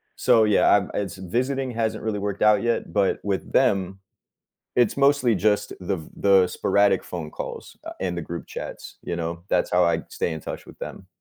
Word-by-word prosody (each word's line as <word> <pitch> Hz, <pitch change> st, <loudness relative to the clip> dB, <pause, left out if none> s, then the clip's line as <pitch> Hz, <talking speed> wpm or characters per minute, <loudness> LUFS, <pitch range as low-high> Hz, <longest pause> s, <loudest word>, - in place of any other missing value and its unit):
So, 110 Hz, -, +4 dB
yeah, 105 Hz, -1 st, +5 dB
I'm 100 Hz, -2 st, 0 dB
it's 95 Hz, -2 st, -3 dB
visiting 130 Hz, +8 st, -1 dB
hasn't 115 Hz, -2 st, -2 dB
really 110 Hz, -2 st, -1 dB
worked 100 Hz, -1 st, -3 dB
out 105 Hz, 0 st, +5 dB
yet, 120 Hz, 0 st, -1 dB
but 100 Hz, -2 st, +1 dB
with 100 Hz, -2 st, -2 dB
them, 95 Hz, 0 st, +2 dB, 0.8 s
it's 120 Hz, 0 st, +2 dB
mostly 140 Hz, -5 st, +3 dB
just 105 Hz, +2 st, +1 dB
the 95 Hz, 0 st, -2 dB
v 80 Hz, -, -11 dB
the 95 Hz, -2 st, +5 dB
sporadic 100 Hz, -2 st, +2 dB
phone 80 Hz, -4 st, -6 dB
calls, -, -, -7 dB
uh, -, -, -6 dB
and 90 Hz, -2 st, -2 dB
the -, -, -3 dB
group 85 Hz, +2 st, -7 dB
chats, -, -, -8 dB
you 85 Hz, -, -3 dB
know, 85 Hz, +1 st, -4 dB
that's 90 Hz, -, +1 dB
how 90 Hz, 0 st, +4 dB
I 85 Hz, -, +1 dB
stay 85 Hz, -, -2 dB
in 80 Hz, -, -5 dB
touch -, -, -7 dB
with -, -, -14 dB
them. 95 Hz, -, -8 dB
100 Hz, 200 wpm, -24 LUFS, 90-110 Hz, 0.8 s, yeah